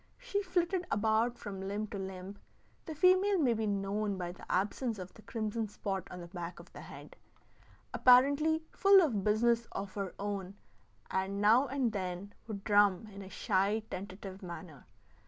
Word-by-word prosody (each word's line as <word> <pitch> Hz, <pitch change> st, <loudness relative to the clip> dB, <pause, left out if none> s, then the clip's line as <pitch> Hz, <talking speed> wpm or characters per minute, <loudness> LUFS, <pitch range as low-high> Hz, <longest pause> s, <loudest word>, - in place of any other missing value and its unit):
She -, -, -2 dB
flitted 365 Hz, -1 st, 0 dB
about 220 Hz, +3 st, +1 dB
from 195 Hz, -2 st, -7 dB
limb 200 Hz, +2 st, -2 dB
to 200 Hz, -, -5 dB
limb 190 Hz, +1 st, -7 dB, 0.5 s
(the 315 Hz, -, -5 dB
female 370 Hz, +5 st, +4 dB
may 265 Hz, -8 st, +3 dB
be 220 Hz, -1 st, -1 dB
known 200 Hz, 0 st, -1 dB
by 175 Hz, -1 st, -3 dB
the 180 Hz, -, -10 dB
absence 210 Hz, +5 st, 0 dB
of 185 Hz, -1 st, -8 dB
the -, -, -15 dB
crimson 220 Hz, 0 st, -3 dB
spot 195 Hz, -2 st, -4 dB
on 180 Hz, -, -8 dB
the 170 Hz, -, -8 dB
back 175 Hz, -1 st, -7 dB
of -, -, -15 dB
the -, -, -9 dB
head), -, -, -11 dB, 0.8 s
apparently 285 Hz, +6 st, +5 dB
full 395 Hz, 0 st, +6 dB
of 225 Hz, -, 0 dB
business 230 Hz, +3 st, +2 dB
of 195 Hz, 0 st, -5 dB
her 195 Hz, -2 st, -4 dB
own, 200 Hz, -1 st, -4 dB, 0.6 s
and 190 Hz, +1 st, -1 dB
now 225 Hz, +7 st, +5 dB
and 265 Hz, -3 st, 0 dB
then 190 Hz, 0 st, -4 dB
would 200 Hz, -3 st, -6 dB
drum 205 Hz, 0 st, +3 dB
in 200 Hz, -, -8 dB
a 190 Hz, -, -9 dB
shy, 200 Hz, +3 st, +1 dB
tentative 190 Hz, +1 st, -7 dB
manner. 170 Hz, -5 st, -9 dB
205 Hz, 170 wpm, -32 LUFS, 190-245 Hz, 0.8 s, full